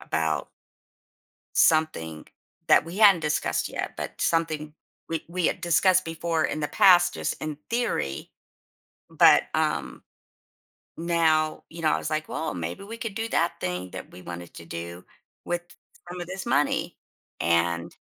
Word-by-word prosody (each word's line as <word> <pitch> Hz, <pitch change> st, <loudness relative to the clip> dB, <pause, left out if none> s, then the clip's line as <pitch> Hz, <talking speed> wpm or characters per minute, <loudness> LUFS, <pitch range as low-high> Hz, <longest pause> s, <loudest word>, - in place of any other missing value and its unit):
about -, -, -1 dB, 1.1 s
something 80 Hz, -, +2 dB, 0.4 s
that -, -, +6 dB
we 170 Hz, +5 st, -7 dB
hadn't 200 Hz, -5 st, +7 dB
discussed 150 Hz, -1 st, 0 dB
yet, -, -, -4 dB
but -, -, -6 dB
something 155 Hz, -2 st, 0 dB, 0.3 s
we 165 Hz, -1 st, -3 dB
we 170 Hz, 0 st, -1 dB
had -, -, 0 dB
discussed 185 Hz, +1 st, +4 dB
before 165 Hz, 0 st, -1 dB
in 155 Hz, -, -1 dB
the 150 Hz, -, -1 dB
past 180 Hz, -2 st, +5 dB
just -, -, -2 dB
in 155 Hz, -1 st, -3 dB
theory. 230 Hz, -, -2 dB, 0.8 s
But, -, -, +6 dB
um, -, -, -1 dB, 0.9 s
now, 160 Hz, -2 st, +1 dB
you 165 Hz, 0 st, -9 dB
know, 155 Hz, -, +4 dB
I -, -, +1 dB
was -, -, -4 dB
like, 155 Hz, 0 st, -2 dB
well, 160 Hz, -, -3 dB
maybe 85 Hz, -, -5 dB
we 225 Hz, +3 st, -8 dB
could 230 Hz, -3 st, -5 dB
do 225 Hz, +1 st, -3 dB
that 170 Hz, -4 st, 0 dB
thing 90 Hz, 0 st, -3 dB
that -, -, -8 dB
we 90 Hz, -, -12 dB
wanted 85 Hz, 0 st, -8 dB
to 85 Hz, -, -10 dB
do 85 Hz, +2 st, -7 dB, 0.4 s
with 175 Hz, 0 st, -1 dB, 0.5 s
some 180 Hz, 0 st, -6 dB
of 175 Hz, -, -4 dB
this 190 Hz, +1 st, -6 dB
money 140 Hz, +3 st, +1 dB, 0.4 s
and 85 Hz, 0 st, +1 dB
160 Hz, 155 wpm, -26 LUFS, -, 1.1 s, hadn't